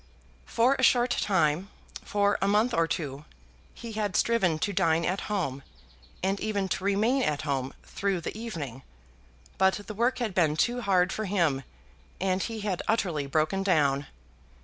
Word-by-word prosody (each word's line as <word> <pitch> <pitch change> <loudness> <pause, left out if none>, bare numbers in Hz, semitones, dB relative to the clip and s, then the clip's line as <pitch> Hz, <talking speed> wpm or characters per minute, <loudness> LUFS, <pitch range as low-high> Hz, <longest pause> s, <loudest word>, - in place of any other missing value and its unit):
For 245 +4 +3
a - - +1
short 245 0 +4
time, 185 -1 +1 0.3
for 205 0 +1
a 195 - +2
month 215 +4 +2
or 165 -4 +2
two, 145 -3 -4 0.5
he 235 -1 -8
had 210 -3 -2
striven 195 -9 +2
to 200 +6 -1
dine 165 -1 +2
at 185 +2 -1
home 160 -10 -2 0.6
and 195 +1 0
even 205 -3 -1
to 185 - -2
remain 215 +7 +2
at 150 - 0
home 135 -3 -2
through 195 -3 -2
the - - -5
evening; 160 - -6 0.8
but 190 0 +4
the 215 - -6
work 235 +5 +1
had 235 -6 -2
been 160 -4 +2
too 245 +8 +1
hard 190 -3 +2
for 215 - -3
him 170 -9 +1 0.6
and 185 0 0
he 225 0 -4
had 200 -4 -2
utterly 175 -10 0
broken 155 +6 +1
down. 145 -7 +2
190 Hz, 165 wpm, -28 LUFS, 155-215 Hz, 0.8 s, short